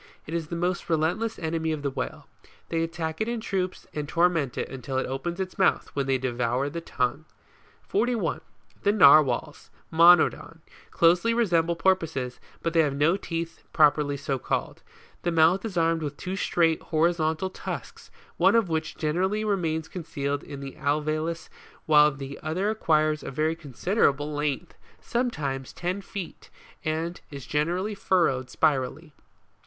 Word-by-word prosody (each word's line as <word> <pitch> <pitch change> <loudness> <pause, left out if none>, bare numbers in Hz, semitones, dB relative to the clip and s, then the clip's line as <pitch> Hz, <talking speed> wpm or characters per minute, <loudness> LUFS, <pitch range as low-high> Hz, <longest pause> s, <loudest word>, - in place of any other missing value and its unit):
It 155 - -7
is 165 -2 -2
the 170 - -5
most 175 +1 -2
relentless 175 +8 0
enemy 160 -1 -2
of 155 -2 -3
the 140 - -1
whale. - - -5 0.4
They 165 -1 0
attack 165 0 -3
it 220 - +1
in 235 0 -2
troops, 185 -4 -3
and 150 -1 -4
torment 165 -6 +1
it - - -2
until 130 0 -5
it 130 - 0
opens 170 +7 -4
its 190 +1 -4
mouth, 190 - +2
when 140 -1 -1
they 135 -1 +2
devour 125 +2 -1
the 170 +2 -4
tongue. 140 0 -2 0.6
41. 220 -9 0 0.4
The 205 - +3
NARWHALS, 145 - +5 0.2
Monodon, 165 -1 +5 0.3
closely 175 +7 +3
resemble 170 -7 +2
porpoises, 160 -9 0 0.2
but 165 - -1
they 165 - +3
have 145 -4 +2
no 150 +5 +3
teeth 165 -3 -5
properly 150 -2 +3
so 140 -2 -2
called. - - -3 0.4
The 175 - 0
mouth 165 +3 +4
is 200 -5 -4
armed 165 0 +2
with 145 -2 -4
two 185 +1 -4
straight, 165 -4 +1
horizontal 160 +2 0
tusks, - - -7 0.3
one 190 +5 +4
of 225 -6 +3
which 160 0 -2
generally 190 +7 0
re 205 -2 +2
mains 160 -3 -2
concealed 145 -5 -3
in 140 -1 -9
the 135 -1 -8
alveolus 155 +3 -1 0.4
while 150 -1 +6
the 135 0 -8
other 185 +7 -1
acquires 155 -7 +1
a - - -6
very 155 +4 0
considerable 150 - 0
length, 150 +3 -2 0.3
sometimes 145 - -2
ten 180 +3 -3
feet, 195 -2 -8 0.3
and 160 +3 -2
is 140 -3 -8
generally 175 +8 -1
furrowed 165 -10 +1
spirally. 150 +2 0
160 Hz, 155 wpm, -26 LUFS, 145-175 Hz, 0.6 s, while